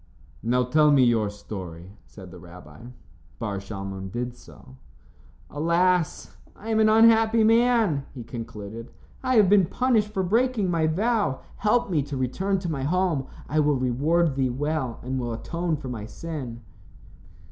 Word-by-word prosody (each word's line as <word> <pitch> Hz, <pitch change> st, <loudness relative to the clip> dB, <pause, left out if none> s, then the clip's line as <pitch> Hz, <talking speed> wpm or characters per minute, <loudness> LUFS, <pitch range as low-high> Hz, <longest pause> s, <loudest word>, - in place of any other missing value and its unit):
"Now 125 Hz, +2 st, +1 dB
tell 150 Hz, +5 st, +3 dB
me 140 Hz, -3 st, +5 dB
your 115 Hz, -4 st, +2 dB
story," 95 Hz, -4 st, -9 dB, 0.2 s
said -, -, -12 dB
the -, -, -11 dB
rabbi. 85 Hz, +1 st, -13 dB, 0.5 s
Bar 100 Hz, +5 st, -3 dB
Shalmon 95 Hz, -1 st, -7 dB
did 120 Hz, +2 st, -4 dB
so. 65 Hz, -, -16 dB, 0.7 s
"Alas! 170 Hz, +3 st, 0 dB, 0.2 s
I 225 Hz, +2 st, -7 dB
am 220 Hz, -, +2 dB
an 215 Hz, 0 st, +5 dB
unhappy 225 Hz, 0 st, +5 dB
man," 225 Hz, -, +3 dB
he 125 Hz, -, -7 dB
concluded. 115 Hz, -1 st, -8 dB, 0.3 s
"I 255 Hz, -1 st, 0 dB
have 210 Hz, -4 st, +6 dB
been 195 Hz, -2 st, +5 dB
punished 230 Hz, -3 st, +1 dB
for 190 Hz, -2 st, -1 dB
breaking 220 Hz, 0 st, +1 dB
my 165 Hz, -2 st, +1 dB
vow. 205 Hz, -, 0 dB, 0.2 s
Help 210 Hz, 0 st, +1 dB
me 155 Hz, -4 st, +2 dB
to 140 Hz, 0 st, -5 dB
return 190 Hz, +10 st, -1 dB
to 175 Hz, -3 st, -3 dB
my 140 Hz, -3 st, -3 dB
home. 165 Hz, -2 st, 0 dB, 0.2 s
I 155 Hz, -, 0 dB
will 150 Hz, -1 st, +3 dB
reward 145 Hz, +6 st, +1 dB
thee 130 Hz, -1 st, 0 dB
well, 135 Hz, -2 st, -2 dB
and 130 Hz, +1 st, -3 dB
will 120 Hz, -2 st, -3 dB
atone 170 Hz, +7 st, -3 dB
for 140 Hz, -, -8 dB
my 110 Hz, -4 st, -6 dB
sin." 130 Hz, -6 st, -7 dB
150 Hz, 160 wpm, -25 LUFS, 120-195 Hz, 0.7 s, have